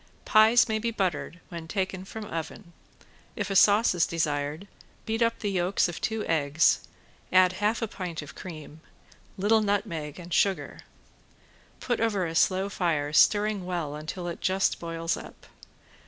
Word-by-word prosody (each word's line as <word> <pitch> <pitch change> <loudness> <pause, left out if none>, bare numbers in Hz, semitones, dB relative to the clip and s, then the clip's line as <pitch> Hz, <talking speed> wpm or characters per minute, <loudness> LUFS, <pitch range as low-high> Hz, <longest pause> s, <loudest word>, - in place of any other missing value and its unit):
Pies 220 +2 +6
may 220 -1 -1
be 230 +2 -1
buttered 180 -5 -2
when 170 -2 -7
taken 190 0 -3
from 220 +2 -7
oven. 170 0 -7 0.6
If 205 -1 -3
a - - -1
sauce 205 +3 +5
is 175 -2 +2
desired, 150 +2 -2 0.4
beat 225 +1 -2
up 230 0 +2
the 205 - -3
yolks 185 0 +1
of 175 - -7
two 220 -1 -2
eggs, 155 0 +2 0.5
add 185 0 +5
half 210 +4 0
pint 175 -5 -5
of 145 - -11
cream, 160 -3 -10 0.6
little 215 +3 +3
nutmeg 195 -8 -2
and 175 -1 -8
sugar. 195 +2 +1 1.0
Put 240 -2 -1
over 205 -5 +1
a 165 - -4
slow 185 +3 +2
fire, 160 -7 -1
stirring 205 +3 +4
well 175 -5 -3
until 155 +4 -6
it 170 - -6
just 190 +1 +1
boils 165 0 -2
up. - - -12
185 Hz, 155 wpm, -27 LUFS, 165-205 Hz, 1.0 s, Pies